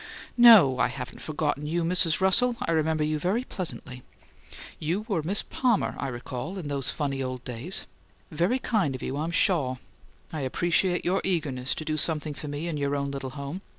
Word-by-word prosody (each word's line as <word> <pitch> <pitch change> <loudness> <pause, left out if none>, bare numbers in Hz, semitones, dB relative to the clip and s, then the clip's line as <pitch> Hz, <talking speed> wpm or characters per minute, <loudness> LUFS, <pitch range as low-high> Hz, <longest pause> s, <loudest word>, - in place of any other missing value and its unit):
"No, 205 - +8
I - - +4
haven't - - -7
forgotten 150 -1 -2
you, 170 +2 0
Mrs. 170 -1 +3
Russell. 235 +6 +4
I - - 0
remember 160 -1 +1
you 155 0 0
quite 205 - -1
pleasantly, 155 -8 -5
in - - -14 0.5
fact. - - -13 0.2
You 175 +7 -1
were 200 -7 0
a - - -4
Miss 195 +6 +1
Palmer, 245 -5 +1
I 140 - -2
recall, 125 +8 -5
in 165 -6 -5
those 140 -2 -1
funny 140 -3 -2
old 130 -1 -4
days. 125 +10 -3 0.5
Very 175 +11 +1
kind 205 - 0
of 130 - -7
you, 135 - -3
I'm 155 +3 -2
shaw. 170 -7 +2 0.6
I 155 - -3
appreciate 175 +6 +1
your 185 +2 +1
eagerness 145 -8 -1
to 155 - -6
do 155 0 -1
something 155 -1 0
for 145 +2 -7
me 145 +3 -4
in 165 -3 -2
your 140 0 0
own 140 0 -2
little 135 -1 -5
home. 140 +7 -5
155 Hz, 200 wpm, -27 LUFS, 140-180 Hz, 0.6 s, No